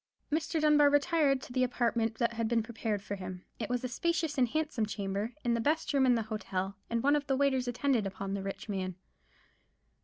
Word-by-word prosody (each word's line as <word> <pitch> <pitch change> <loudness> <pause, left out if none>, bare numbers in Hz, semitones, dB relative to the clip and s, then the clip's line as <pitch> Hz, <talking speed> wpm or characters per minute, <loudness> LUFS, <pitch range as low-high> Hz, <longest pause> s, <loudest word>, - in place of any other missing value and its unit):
Mr. 320 +2 0
Dunbar 300 -1 +5
retired 285 -2 +3
to - - -9
the 255 0 +2
apartment 235 -2 0
that 235 +1 0
had 230 -1 -1
been 230 -1 +2
prepared 220 -3 -3
for 205 - -5
him. 185 -2 -6
It 220 - -3
was 245 0 -1
a - - 0
spacious 330 +4 -1
and 255 -3 +3
handsome 295 -5 -1
chamber, 205 +2 -3
the 235 -2 +1
best 305 +5 0
room 270 -2 +4
in 245 - +5
the 225 - 0
hotel; 200 -3 -3
and 230 0 0
one 285 +2 +5
of 290 -1 -1
the 270 - +1
waiters 265 -2 +2
attended 245 -3 +1
upon 195 0 -5
the 200 - -2
rich 195 +3 -5
man. 190 -3 -3
240 Hz, 210 wpm, -31 LUFS, 210-280 Hz, -, Dunbar